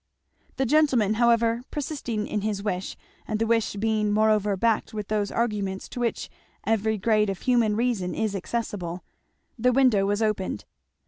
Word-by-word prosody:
The 265 - 0
gentleman 255 -7 +3
however 235 0 +3
persisting 270 -7 -3
in 210 - -2
his 205 -1 -2
wish 185 -3 -3 0.3
and 215 - -1
the 225 - 0
wish 225 -1 +1
being 215 0 0
moreover 210 -1 +2
backed 225 +1 0
with 210 -2 -5
those 210 -1 0
arguments 205 -5 -2
to - - -7
which 235 -2 -1 0.4
every 220 0 +1
grade 210 0 +2
of 195 - -4
human 235 -4 +2
reason 225 -6 -1
is 215 -2 -1
accessible, 185 -4 -4 0.6
the 250 +2 +3
window 245 -7 +3
was 205 +2 +1
opened. 195 - -2
215 Hz, 155 wpm, -25 LUFS, 205-235 Hz, 0.6 s, gentleman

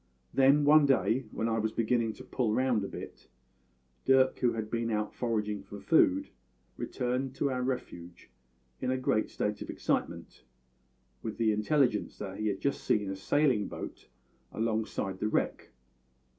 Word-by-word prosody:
"Then 140 +2 +5
one 150 0 +7
day, 130 -1 +2
when 110 - -2
I 115 0 0
was 110 0 0
beginning 115 0 +1
to - - -12
pull 115 -4 -1
round 130 -5 +2
a - - -3
bit, - - -9 0.8
Dirk 130 0 +4
who 120 - +2
had 110 -1 -4
been 115 0 -1
out 105 -1 -1
foraging 105 -4 -1
for 100 +1 -10
food 275 - +3 0.5
returned 125 +1 -2
to 140 0 0
our 125 -1 -1
refuge 90 - -5 0.5
in - - -1
a 130 - +1
great 120 -4 +1
state 105 0 -2
of - - -6
excitement, - - -2 0.8
with 110 -2 -5
the 115 -2 +3
intelligence 110 +1 +1
that 95 -2 -6
he 110 - -1
had 100 -2 -1
just 140 - -1
seen 105 -2 +1
a - - -3
sailing 125 +1 +2
boat - - -8 0.4
alongside 110 -4 -2
the 105 - 0
wreck. - - -1
115 Hz, 160 wpm, -30 LUFS, 105-130 Hz, 0.8 s, one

